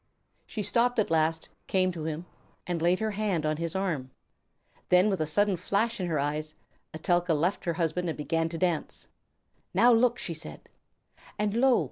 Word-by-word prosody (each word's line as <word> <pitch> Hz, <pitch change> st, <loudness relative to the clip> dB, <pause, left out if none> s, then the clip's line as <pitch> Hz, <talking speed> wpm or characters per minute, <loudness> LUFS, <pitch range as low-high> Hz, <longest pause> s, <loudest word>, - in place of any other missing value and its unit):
She 215 Hz, -, -4 dB
stopped 235 Hz, +4 st, +2 dB
at 215 Hz, -6 st, +1 dB
last, 160 Hz, 0 st, +1 dB, 0.2 s
came 185 Hz, -1 st, +2 dB
to 165 Hz, -3 st, -6 dB
him, 160 Hz, +2 st, -4 dB, 0.4 s
and 175 Hz, -2 st, -2 dB
laid 175 Hz, +2 st, +3 dB
her 220 Hz, +1 st, -1 dB
hand 200 Hz, -6 st, -1 dB
on 155 Hz, 0 st, 0 dB
his 165 Hz, +1 st, -3 dB
arm. 165 Hz, -9 st, -2 dB
[Illustration: -, -, -40 dB
Then 180 Hz, +3 st, +5 dB
with 190 Hz, -, -1 dB
a 155 Hz, -, 0 dB
sudden 200 Hz, +4 st, +3 dB
flash 215 Hz, +6 st, 0 dB
in 180 Hz, -, -1 dB
her 160 Hz, -3 st, 0 dB
eyes, 150 Hz, +2 st, -2 dB, 0.4 s
Etelka 175 Hz, +1 st, +1 dB
left 175 Hz, +6 st, 0 dB
her 170 Hz, -, 0 dB
husband 170 Hz, +1 st, -1 dB
and 160 Hz, -, -4 dB
began 165 Hz, +2 st, -1 dB
to 165 Hz, -, -4 dB
dance. 175 Hz, -3 st, -1 dB
Page -, -, -35 dB, 0.6 s
202.] -, -, -6 dB
"Now 240 Hz, +4 st, +7 dB
look," 240 Hz, +1 st, +3 dB
she 170 Hz, -, -3 dB
said. 160 Hz, +1 st, -8 dB, 0.7 s
And 210 Hz, -1 st, 0 dB
lo! 250 Hz, +2 st, +4 dB
175 Hz, 195 wpm, -28 LUFS, 160-205 Hz, 0.7 s, Now